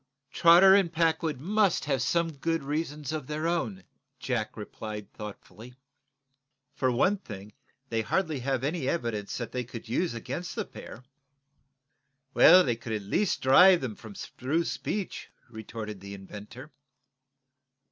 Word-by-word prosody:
"Trotter 175 Hz, +3 st, +7 dB
and 195 Hz, -4 st, +4 dB
Packwood 160 Hz, -3 st, 0 dB
must 200 Hz, +4 st, +1 dB
have 135 Hz, -4 st, 0 dB
some 165 Hz, +6 st, +1 dB
good 165 Hz, +2 st, -2 dB
reasons 150 Hz, 0 st, -3 dB
of 155 Hz, -4 st, -4 dB
their 150 Hz, +1 st, -3 dB
own," 175 Hz, +3 st, -2 dB, 0.3 s
Jack 120 Hz, -5 st, -3 dB
replied, 105 Hz, 0 st, -7 dB
thoughtfully. 110 Hz, +3 st, -10 dB, 1.0 s
"For 130 Hz, -1 st, 0 dB
one 185 Hz, +12 st, +2 dB
thing, 105 Hz, -, -10 dB, 0.4 s
they 115 Hz, -1 st, 0 dB
hardly 160 Hz, -, -1 dB
have 130 Hz, 0 st, -1 dB
any 145 Hz, -2 st, -1 dB
evidence 115 Hz, -10 st, -2 dB
that 120 Hz, -, -5 dB
they 125 Hz, -, -2 dB
could 115 Hz, -1 st, -9 dB
use 125 Hz, +5 st, -1 dB
against 130 Hz, +9 st, -5 dB
the -, -, -2 dB
pair." 125 Hz, -, -11 dB, 1.3 s
"They 160 Hz, -10 st, +7 dB
could 115 Hz, -1 st, -6 dB
at 105 Hz, -2 st, -3 dB
least 180 Hz, -, 0 dB
drive 180 Hz, +8 st, +7 dB
them 125 Hz, -5 st, -3 dB
from 105 Hz, -1 st, -12 dB
Spruce 155 Hz, +7 st, -2 dB
Beach," 200 Hz, -4 st, -4 dB, 0.2 s
retorted 110 Hz, -2 st, -7 dB
the 100 Hz, +1 st, -8 dB
inventor. 105 Hz, +8 st, -11 dB
130 Hz, 135 wpm, -28 LUFS, 115-165 Hz, 1.3 s, Trotter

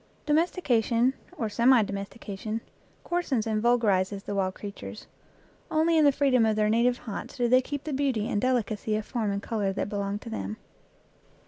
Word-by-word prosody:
Domestication, 260 Hz, -, +2 dB, 0.2 s
or 225 Hz, -, -1 dB
semi 235 Hz, +3 st, +4 dB
domestication, 200 Hz, +2 st, -5 dB, 0.4 s
coarsens 315 Hz, -, 0 dB
and 215 Hz, -1 st, 0 dB
vulgarizes 205 Hz, -5 st, +2 dB
the 205 Hz, -, -4 dB
wild 190 Hz, -1 st, 0 dB
creatures; 205 Hz, -1 st, -8 dB, 0.6 s
only 320 Hz, +2 st, +2 dB
in 310 Hz, -2 st, +5 dB
the 285 Hz, -, +7 dB
freedom 270 Hz, -3 st, +3 dB
of 220 Hz, -1 st, +2 dB
their 210 Hz, 0 st, +2 dB
native 240 Hz, +2 st, +3 dB
haunts 215 Hz, +2 st, -7 dB
do 245 Hz, -1 st, +2 dB
they 255 Hz, +2 st, +5 dB
keep 285 Hz, +2 st, -5 dB
the 305 Hz, -, -4 dB
beauty 260 Hz, -6 st, 0 dB
and 205 Hz, -, 0 dB
delicacy 225 Hz, -4 st, 0 dB
of 215 Hz, 0 st, -2 dB
form 230 Hz, -5 st, -2 dB
and 200 Hz, 0 st, -3 dB
color 210 Hz, -4 st, -1 dB
that 195 Hz, -, -3 dB
belong 200 Hz, 0 st, -2 dB
to 230 Hz, -, -9 dB
them. 220 Hz, -1 st, -4 dB
225 Hz, 175 wpm, -27 LUFS, 205-255 Hz, 0.6 s, the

